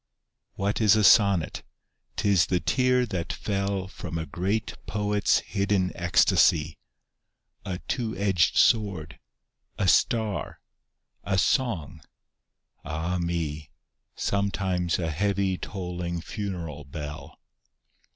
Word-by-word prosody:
What 100 +3 -1
is 110 0 +6
a 110 - +2
sonnet? 100 -5 +4 0.5
'T - - -1
is 95 -4 +4
the 90 - +1
tear 125 +2 +2
that 90 -7 -3
fell 100 -2 -2
From 90 -3 -6
a 80 - -3
great 95 +8 -2
poet's 105 -1 +1
hidden 100 0 0
ecstasy; 80 -2 +3 0.9
A 95 -3 -3
two 115 -6 -2
edged 95 -4 +2
sword, 95 -9 +2 0.6
a 95 - 0
star, 110 +1 +1 0.6
a 95 -1 0
song 95 - 0 0.4
— - - -49
ah 80 +4 -2
me 85 -3 -2
I 75 - -21 0.5
Sometimes 95 -3 0
a 80 -3 -2
heavy 100 +2 0
tolling 90 -2 -4
funeral 85 -5 -5
bell. 75 +2 -8
95 Hz, 110 wpm, -26 LUFS, 85-100 Hz, 0.9 s, is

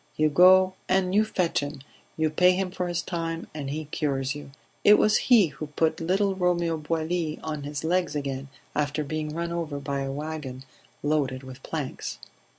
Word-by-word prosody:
You 155 0 +4
go 185 +3 +7 0.2
and 185 0 +2
you 210 +2 +5
fetch 185 -6 0
him, 145 -1 -5 0.4
you 160 -1 +1
pay 180 +3 +5
him 185 0 -1
for 180 -1 -2
his 175 -1 -2
time, 165 -1 -3
and 145 -3 -5
he 155 +2 -3
cures 140 -2 -1
you. 145 -1 -9 0.3
It 210 - +8
was 215 0 +4
he 220 -9 +7
who 150 +2 -7
put 160 +2 0
little 195 +4 +2
Romeo 175 -3 +1
Boilly 160 +1 -2
on 155 -2 -3
his 145 -1 -4
legs 175 0 +1
again 140 -1 -3 0.3
after 150 +1 0
being 155 +1 -3
run 170 0 -2
over 165 -4 -3
by 140 0 -3
a 135 0 -2
wagon 145 -3 -5 0.4
loaded 140 -3 0
with 130 0 -10
planks." 145 -3 -4
155 Hz, 180 wpm, -26 LUFS, 145-180 Hz, 0.4 s, It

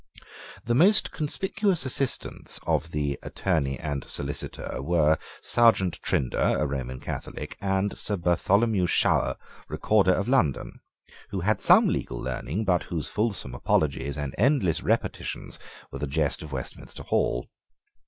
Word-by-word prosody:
The 120 - +1
most 185 - +4
conspicuous 190 +2 -1
assistants 130 0 -1
of 80 - 0
the 75 -2 -2
Attorney 70 -5 -1
and 75 -3 -3
Solicitor 70 -1 -4
were 80 0 +2 0.2
Serjeant 110 -7 +3
Trinder, 65 - +1
a 75 - +1
Roman 65 -3 -4
Catholic, - - -6
and 95 +1 0
Sir 105 - -1
Bartholomew 95 +3 +2
Shower, - - +2 0.3
Recorder 100 -4 +3
of 100 +4 -1
London, 120 - +1 0.5
who 95 -2 -3
had 110 +5 +1
some - - +6
legal - - -2
learning, 70 - -3
but 90 -3 +2
whose 80 -3 -3
fulsome 105 - -1
apologies 70 +2 0
and 70 -2 -4
endless 120 - +2
repetitions - - -2 0.3
were - - -6
the 75 - -2
jest 75 +1 0
of 80 - -9
Westminster 65 -2 -6
Hall. - - 0
85 Hz, 135 wpm, -26 LUFS, 70-110 Hz, 0.5 s, some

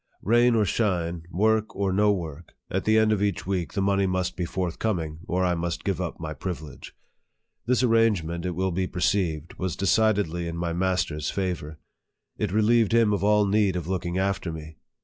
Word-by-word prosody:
Rain 120 +3 +4
or 110 -2 +3
shine, 85 -5 -1
work 110 +4 +1
or 95 -1 0
no 105 +2 +4
work, 85 -4 -5 0.2
at 95 - -1
the 110 0 +4
end 110 0 +4
of 105 -2 +1
each 100 -3 -1
week 95 -2 -2
the 100 - 0
money 100 0 +2
must 90 -1 -1
be 90 - -2
forthcoming, 85 -2 -2
or 90 +1 +1
I 90 - +2
must 85 -1 -3
give - - -1
up - - -4
my 80 -1 -4
privilege. 80 -5 -7 0.7
This 125 0 +2
arrangement, 105 -8 +2
it 90 -2 -3
will 95 +1 0
be 90 +2 -1
perceived, 85 -2 -1
was 95 -2 -2
decidedly 100 -4 +1
in 85 0 -4
my 85 0 -2
master's 85 -4 -1
favor. 90 -5 -3 0.6
It 105 -4 -1
relieved 110 +2 +3
him 115 -3 +4
of 100 - -1
all 105 0 +4
need 100 -2 +2
of 85 -3 -3
looking 90 -1 -2
after 95 -2 -1
me. 80 -1 -9
95 Hz, 190 wpm, -26 LUFS, 85-105 Hz, 0.7 s, Rain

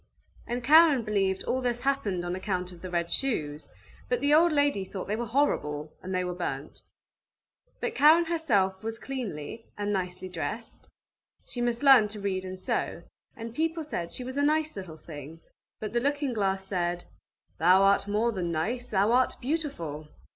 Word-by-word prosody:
And 240 +1 -3
Karen 300 -2 +6
believed 195 -3 0
all 260 - -1
this 245 -1 -1
happened 210 -10 0
on 175 +1 -2
account 185 -1 -3
of 175 -2 -13
the 185 - -6
red 170 -1 -1
shoes, 155 - -2 0.4
but 245 - +1
the 285 +2 +2
old 335 +3 +6
lady 285 -9 +2
thought 190 0 -6
they 210 - 0
were 235 +1 -3
horrible, 155 - 0
and 185 - -6
they 185 -1 0
were 180 0 -3
burnt. 150 -5 -5 1.0
But - - -2
Karen 315 +4 +6
herself 215 - +1
was 225 0 -3
cleanly 225 - -5
and 205 0 -1
nicely 185 -1 -3
dressed; 185 +6 -6 0.6
she 245 - -5
must 240 +2 0
learn 265 -6 +8
to 210 0 -7
read 190 -2 -2
and 185 0 -6
sew; 185 - -2 0.3
and 230 0 -7
people 325 +3 -1
said 175 - -4
she 255 - -4
was 260 +2 -6
a - - +2
nice 305 +1 +1
little 185 -5 -7
thing, 155 0 -10 0.4
but 215 -1 -5
the 240 - +3
looking 285 0 0
glass 195 -3 0
said: 175 -2 -2 0.5
"Thou 185 +4 +6
art 200 +1 +4
more 215 +3 +1
than 180 -5 -2
nice, 240 +10 -2
thou 200 +2 +2
art 255 +1 +3
beautiful!" 240 - -3
210 Hz, 180 wpm, -28 LUFS, 180-260 Hz, 1.0 s, learn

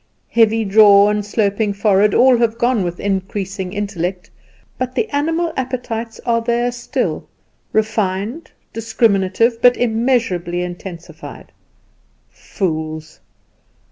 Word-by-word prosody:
Heavy 225 -1 +3
jaw 205 0 +6
and 210 0 -1
sloping 205 0 0
forehead 200 0 +2
all 255 0 +6
have 230 -1 +1
gone 240 -3 +1
with 175 -1 -4
increasing 195 -1 -3
intellect; 190 -3 -4 0.5
but 255 0 -3
the 440 - 0
animal 325 +3 -1
appetites 245 -3 -4
are 230 -1 +1
there 240 +1 0
still 240 0 -3 0.4
refined, 215 - -1 0.2
discriminative, 225 0 +1
but 245 0 +5
immeasurably 220 -8 0
intensified. 175 -1 -9 0.8
Fools! 155 -3 -5
215 Hz, 105 wpm, -18 LUFS, 190-235 Hz, 0.8 s, jaw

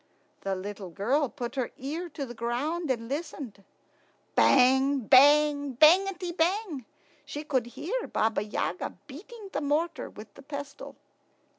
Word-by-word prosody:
The 195 -1 -2
little 195 0 -6
girl 245 - 0
put 240 -2 -6
her 260 -4 -2
ear 320 +7 -5
to 285 -2 -5
the 240 - -8
ground 270 +8 -2
and 230 -3 -1
listened. 275 - -6 0.7
Bang, 265 +1 +4
bang, 285 +3 +5
bangety 360 +6 +4
bang! 345 - -1 0.4
She 295 - -6
could 260 -6 0
hear 390 - -4
Baba 220 -2 0
Yaga 205 -3 -3
beating 395 - -11
the - - -1
mortar 310 +3 -1
with 210 0 -12
the - - -14
pestle. 285 0 -8
280 Hz, 135 wpm, -28 LUFS, 240-315 Hz, 0.7 s, bang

